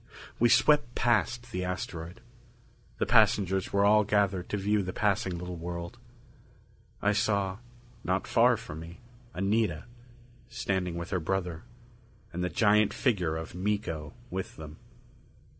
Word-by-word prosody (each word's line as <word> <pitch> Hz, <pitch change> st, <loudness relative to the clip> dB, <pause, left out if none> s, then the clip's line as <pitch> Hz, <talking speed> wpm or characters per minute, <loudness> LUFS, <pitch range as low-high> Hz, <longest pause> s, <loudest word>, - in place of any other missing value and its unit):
We 120 Hz, -, +5 dB
swept 120 Hz, 0 st, +4 dB
past 120 Hz, 0 st, +1 dB
the 90 Hz, -4 st, -2 dB
asteroid. 90 Hz, -2 st, -5 dB, 0.8 s
The -, -, 0 dB
passengers 95 Hz, -1 st, +3 dB
were 100 Hz, 0 st, +3 dB
all 105 Hz, +1 st, +5 dB
gathered 100 Hz, -3 st, +1 dB
to 105 Hz, -, -1 dB
view 105 Hz, +1 st, +1 dB
the 90 Hz, -1 st, -4 dB
passing 100 Hz, -3 st, 0 dB
little 90 Hz, 0 st, -6 dB
world. 85 Hz, +5 st, -6 dB, 1.0 s
I 105 Hz, 0 st, +3 dB
saw, 100 Hz, -2 st, 0 dB, 0.4 s
not 95 Hz, +2 st, 0 dB
far 120 Hz, +1 st, +4 dB
from 80 Hz, -9 st, -8 dB
me, 85 Hz, +3 st, -10 dB, 0.4 s
Anita, 95 Hz, -4 st, 0 dB, 0.7 s
standing 95 Hz, -7 st, -2 dB
with 85 Hz, 0 st, -5 dB
her 95 Hz, -, +1 dB
brother; 90 Hz, -1 st, -3 dB, 0.7 s
and 90 Hz, +1 st, -2 dB
the 90 Hz, -, 0 dB
giant 105 Hz, 0 st, +3 dB
figure 90 Hz, -, +1 dB
of 80 Hz, -, -7 dB
Miko 90 Hz, -5 st, -3 dB, 0.2 s
with 95 Hz, 0 st, -4 dB
them. 75 Hz, -1 st, -10 dB
95 Hz, 135 wpm, -29 LUFS, 90-105 Hz, 1.0 s, We